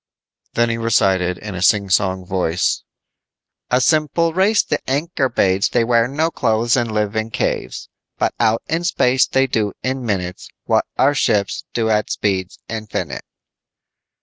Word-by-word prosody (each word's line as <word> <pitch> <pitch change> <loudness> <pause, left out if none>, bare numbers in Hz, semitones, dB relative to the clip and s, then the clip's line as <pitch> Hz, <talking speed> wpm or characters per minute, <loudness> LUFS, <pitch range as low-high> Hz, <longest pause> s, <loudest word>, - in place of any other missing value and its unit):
Then 120 0 +2
he 115 - -3
recited 95 -5 +2
in 105 -1 -7
a 90 - -5
singsong 95 -1 +2
voice: 90 -2 0 0.9
"A 125 - +3
simple 155 +4 +2
race 195 +4 +3
the 150 - -1
Ankorbades 135 - +1
They 115 - +2
wear 115 0 +3
no 155 +5 -1
clothes 115 -3 +1
and 120 -3 0
live 105 0 -1
in 110 +1 -1
caves - - -3 0.3
But - - 0
out 110 +1 +2
in 165 +2 -1
space 130 -6 +2
they 135 0 +2
do 110 -6 -1
in 130 0 -2
minutes 90 -5 -3 0.2
What - - +2
our 140 +2 +4
ships 105 -7 0
do 110 -1 +1
at 105 0 +1
speeds 95 -3 -2
infinite." 110 -1 -5
115 Hz, 150 wpm, -19 LUFS, 100-135 Hz, 0.9 s, our